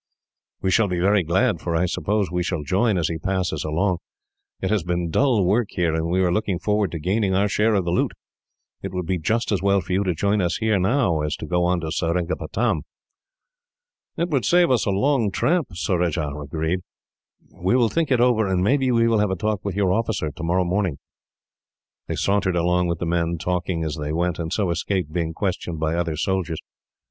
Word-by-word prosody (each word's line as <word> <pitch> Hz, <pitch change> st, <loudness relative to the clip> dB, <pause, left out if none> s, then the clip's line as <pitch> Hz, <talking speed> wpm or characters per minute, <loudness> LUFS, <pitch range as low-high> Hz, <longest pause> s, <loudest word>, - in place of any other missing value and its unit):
"We 95 Hz, -, +1 dB
shall 110 Hz, +2 st, +3 dB
be 90 Hz, -2 st, -2 dB
very 100 Hz, +3 st, +3 dB
glad, 90 Hz, +4 st, +1 dB
for 85 Hz, -1 st, -2 dB
I 85 Hz, +2 st, +2 dB
suppose 100 Hz, +2 st, -1 dB
we 90 Hz, 0 st, 0 dB
shall 90 Hz, -3 st, -2 dB
join, 95 Hz, -, +1 dB
as 85 Hz, -, +1 dB
he 80 Hz, -1 st, -3 dB
passes 90 Hz, -4 st, -1 dB
along. 85 Hz, +4 st, 0 dB, 0.6 s
It 95 Hz, -, -2 dB
has 105 Hz, -3 st, +2 dB
been 85 Hz, 0 st, -2 dB
dull 120 Hz, -, +3 dB
work 105 Hz, +5 st, +2 dB
here, 85 Hz, -3 st, 0 dB
and 80 Hz, 0 st, -1 dB
we 95 Hz, +2 st, +2 dB
are 90 Hz, -, +2 dB
looking 105 Hz, -1 st, 0 dB
forward 105 Hz, +1 st, 0 dB
to 85 Hz, -, -3 dB
gaining 95 Hz, +4 st, 0 dB
our 100 Hz, +2 st, +3 dB
share 105 Hz, +2 st, +2 dB
of 95 Hz, -3 st, +1 dB
the 85 Hz, -, 0 dB
loot. 90 Hz, -, +1 dB, 0.7 s
It 95 Hz, -1 st, -6 dB
would 90 Hz, -1 st, -2 dB
be 90 Hz, +1 st, -1 dB
just 115 Hz, +9 st, 0 dB
as 100 Hz, -, +1 dB
well 100 Hz, 0 st, +3 dB
for 95 Hz, -, -4 dB
you 95 Hz, +2 st, +2 dB
to 90 Hz, -3 st, -1 dB
join 100 Hz, +5 st, +1 dB
us 90 Hz, -1 st, 0 dB
here 110 Hz, -3 st, +1 dB
now, 95 Hz, -, +2 dB
as 75 Hz, 0 st, -1 dB
to -, -, -7 dB
go 90 Hz, 0 st, +1 dB
on 90 Hz, 0 st, +1 dB
to 80 Hz, -1 st, -4 dB
Seringapatam." 85 Hz, +1 st, -1 dB, 1.4 s
"It 170 Hz, +1 st, 0 dB
would 140 Hz, -7 st, +1 dB
save 175 Hz, -, +4 dB
us 125 Hz, -4 st, +2 dB
a -, -, +2 dB
long 115 Hz, +3 st, +2 dB
tramp," 165 Hz, -, +1 dB
Surajah 85 Hz, -4 st, -1 dB
agreed. 80 Hz, +4 st, -2 dB, 0.7 s
"We 90 Hz, +6 st, 0 dB
will 120 Hz, -3 st, +3 dB
think 165 Hz, +3 st, 0 dB
it 130 Hz, -3 st, +3 dB
over, 120 Hz, -4 st, +3 dB
and 95 Hz, -1 st, +1 dB
maybe 130 Hz, +5 st, +2 dB
we 115 Hz, -1 st, +3 dB
will 115 Hz, -2 st, +3 dB
have 105 Hz, -1 st, +2 dB
a 95 Hz, -, 0 dB
talk 105 Hz, +1 st, -2 dB
with 100 Hz, -3 st, -3 dB
your 95 Hz, -2 st, +2 dB
officer, 110 Hz, -8 st, -1 dB
tomorrow 85 Hz, +3 st, 0 dB
morning." 90 Hz, -4 st, 0 dB, 1.1 s
They -, -, -2 dB
sauntered 100 Hz, -2 st, +1 dB
along 90 Hz, +1 st, +2 dB
with 85 Hz, 0 st, -1 dB
the 85 Hz, -, -3 dB
men, 85 Hz, 0 st, 0 dB
talking 90 Hz, 0 st, -2 dB
as 80 Hz, 0 st, -3 dB
they 75 Hz, 0 st, -3 dB
went, 85 Hz, +2 st, -1 dB
and 80 Hz, -1 st, -3 dB
so 100 Hz, -5 st, 0 dB
escaped 90 Hz, -2 st, -2 dB
being 85 Hz, -2 st, -1 dB
questioned 90 Hz, -4 st, -3 dB
by 80 Hz, 0 st, 0 dB
other 85 Hz, -2 st, -1 dB
soldiers. 90 Hz, -2 st, -1 dB
90 Hz, 215 wpm, -23 LUFS, 85-105 Hz, 1.4 s, save